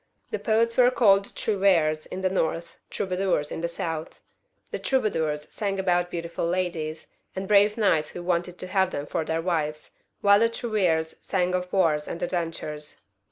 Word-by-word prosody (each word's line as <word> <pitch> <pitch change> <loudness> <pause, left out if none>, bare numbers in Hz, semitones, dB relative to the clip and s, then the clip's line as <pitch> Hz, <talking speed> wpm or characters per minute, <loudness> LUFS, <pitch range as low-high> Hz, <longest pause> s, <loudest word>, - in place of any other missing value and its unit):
The - - -2
poets 230 +1 +1
were 250 -1 +7
called 200 -6 +4
trouvferes 175 -7 +2
in 185 - -6
the 190 - +2
north, 165 -2 -2
troubadours 185 -6 -1
in - - -4
the 170 - 0
south. 165 -2 -5 0.5
The - - -3
troubadours 160 - 0
sang 205 -3 -2
songs 195 - -4
about 175 -1 +1
beautiful 170 -1 -3
ladies, 170 -3 -2 0.3
and 190 0 -4
brave 205 +1 +5
knights 185 -8 +2
who 175 - -7
wanted 175 0 -1
to 185 - -6
have 190 -1 +2
them 145 -5 -4
for 160 - -2
their 160 +1 -2
wives, 155 -4 -2 0.2
while 200 0 +6
the 230 +1 +4
trouvferes 185 -9 0
sang 180 -2 0
of 180 0 -2
wars 160 -6 +2
and 170 - -5
adventures. 165 -4 -4
180 Hz, 170 wpm, -26 LUFS, 160-195 Hz, 0.5 s, were